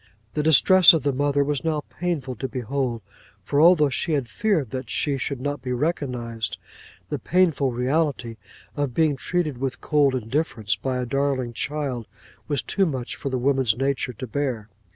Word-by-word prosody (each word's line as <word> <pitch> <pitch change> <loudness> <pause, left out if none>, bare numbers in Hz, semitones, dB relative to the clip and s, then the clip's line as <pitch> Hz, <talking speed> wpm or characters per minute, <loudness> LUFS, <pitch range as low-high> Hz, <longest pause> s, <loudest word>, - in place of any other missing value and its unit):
The 150 - 0
distress 170 +5 +7
of 160 -5 0
the 140 0 +1
mother 145 +1 +1
was 145 -1 -2
now 155 -2 -1 0.2
painful 155 -8 -2
to 130 - -3
behold; 125 -2 -3 0.4
for, 140 +9 +1
although 160 -4 +6
she 160 +5 -1
had 140 -5 0
feared 160 - 0
that 130 0 -5
she 145 -2 0
should 135 +1 -3
not 145 +2 -3
be 125 -1 -3
recognised, 125 -6 -2 0.5
the - - -3
painful 165 -7 +2
reality 125 -2 -1 0.4
of 145 -4 -2
being 155 -3 +3
treated 155 -3 -2
with 135 -1 -3
cold 145 -3 +2
indifference 115 -4 -1
by 130 +5 -3
a 125 - -2
darling 135 -2 -1
child, 135 -3 -3 0.4
was 145 -3 -1
too 195 -2 +1
much 130 -6 -4
for 140 - -4
woman's 130 -3 +1
nature 135 -1 -1
to 125 - -6
bear. 125 -4 -3
140 Hz, 170 wpm, -24 LUFS, 125-150 Hz, 0.5 s, distress